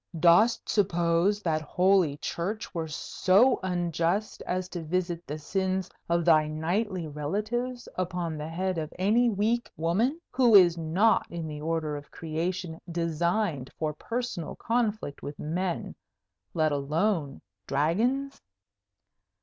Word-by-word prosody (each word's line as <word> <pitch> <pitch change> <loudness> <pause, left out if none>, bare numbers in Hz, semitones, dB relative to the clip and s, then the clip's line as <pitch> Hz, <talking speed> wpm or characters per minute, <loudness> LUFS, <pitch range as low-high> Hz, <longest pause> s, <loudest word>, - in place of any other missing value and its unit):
Dost 175 +8 +5
suppose 180 +1 +2
that 155 -2 +1
Holy 180 -2 +2
Church 195 +8 -4
were 165 -2 -2
so 190 - +3
unjust 175 +2 -1
as 185 0 -1
to 175 - -5
visit 175 +1 -2
the 150 - -4
sins 190 +3 -2 0.2
of 170 -1 +1
thy 155 -3 +5
knightly 175 +4 -1
relatives 215 - -3
upon 175 -3 -2
the 150 0 -5
head 180 +2 -2
of 155 0 -4
any 220 +6 +3
weak 225 +3 0
woman, 215 - +1
who 245 -4 +5
is 175 -4 +8
not 175 +7 +2
in 170 -2 -5
the 150 -1 -6
order 160 -1 -1
of 145 0 -8
creation 165 +1 -4
designed 170 -2 0
for 155 -1 -1
personal 230 -1 -4
conflict 220 -10 -1
with 145 - -7
men, 175 +3 -3 0.6
let 155 -2 +2
alone 150 +1 0 0.3
dragons?" 235 - 0
175 Hz, 125 wpm, -28 LUFS, 160-205 Hz, 0.6 s, is